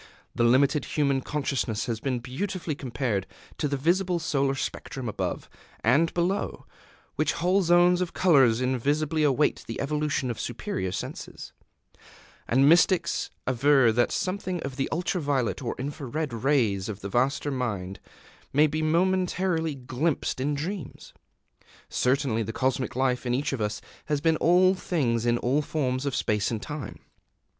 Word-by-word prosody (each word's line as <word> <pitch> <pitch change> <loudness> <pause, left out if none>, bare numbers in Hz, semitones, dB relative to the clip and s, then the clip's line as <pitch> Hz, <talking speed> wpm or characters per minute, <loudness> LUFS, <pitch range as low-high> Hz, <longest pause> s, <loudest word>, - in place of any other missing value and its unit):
The 120 - 0
limited 135 +5 +3
human 140 -3 +1
consciousness 135 -7 -2
has 115 -3 -3
been 130 +1 -1
beautifully 165 +7 -4
compared 120 -7 -2 0.3
to 150 - +1
the 140 0 -1
visible 175 +5 +1
solar 140 -4 0
spectrum, 135 -1 -5
above 95 -4 -3 0.4
and 140 +9 +3
below 180 +3 -1 0.5
which - - +1
whole 185 +3 +2
zones 175 +1 +4
of 180 - -1
colors 135 -10 +4
invisible 145 +5 0
await 145 +1 +2
the 115 - -5
evolution 145 -3 -1
of 115 - -7
superior 95 -1 -3
senses; - - -7 0.9
and 135 +3 +4
mystics 175 +3 +3 0.2
aver 130 -1 +4
that 120 +2 +2
something 185 -1 -2
of 135 -1 -5
the 135 0 -2
ultra 175 +2 -1
violet 140 -4 0
or 120 - -3
infra 140 +2 -5
red 150 0 -3
rays 115 -6 +1
of 105 -1 -6
the 100 - -4
vaster 135 +6 0
Mind 105 -8 -3 0.5
may 150 +3 +5
be 155 +1 -1
momentarily 175 -1 +1
glimpsed 130 +3 -2
in 145 +2 0
dreams. 165 +3 -6 0.8
Certainly 125 -3 +1
the 110 0 -3
Cosmic 130 +1 -1
Life 130 -1 0
in 120 - +1
each 140 +2 -1
of 130 - -3
us 105 0 -2 0.2
has 150 -2 0
been 160 +1 +2
all 180 +3 +4
things 120 -11 -1
in 120 0 +3
all 130 +5 +1
forms 135 -3 -2
of 140 - -1
space 105 -2 0
and 115 - -2
time. 150 +5 -7
140 Hz, 150 wpm, -26 LUFS, 120-160 Hz, 0.9 s, may